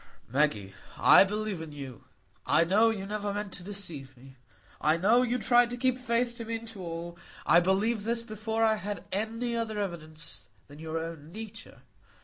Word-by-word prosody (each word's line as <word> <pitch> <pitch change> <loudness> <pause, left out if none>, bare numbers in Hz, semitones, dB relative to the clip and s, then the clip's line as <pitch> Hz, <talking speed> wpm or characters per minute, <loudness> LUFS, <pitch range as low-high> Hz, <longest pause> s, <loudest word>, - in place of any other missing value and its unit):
"Maggie,—I 115 - +4
believe 210 -2 -3
in 160 -2 -7
you; 135 -4 -9 0.4
I 165 - +5
know 205 +7 +4
you 205 -4 -3
never 205 0 -2
meant 205 -1 -4
to 180 - -8
deceive 170 -10 -7
me; 130 +2 -15 0.5
I 155 +2 +3
know 215 +8 +4
you 250 0 +1
tried 240 +2 +4
to 245 - -5
keep 255 0 +1
faith 235 -1 0
to 230 - -6
me 230 +1 -2
and 230 0 -7
to 210 -4 -9
all. 170 0 -6 0.3
I 170 - +7
believed 200 +5 +1
this 230 +1 0
before 220 0 -1
I 220 -1 +3
had 205 0 -5
any 230 +4 -2
other 225 -2 -2
evidence 165 -6 -3
of - - -19
it - - -36
than 145 +1 -12
your 160 0 -4
own 165 -1 -6
nature. 220 - -9
205 Hz, 190 wpm, -29 LUFS, 165-225 Hz, 0.5 s, I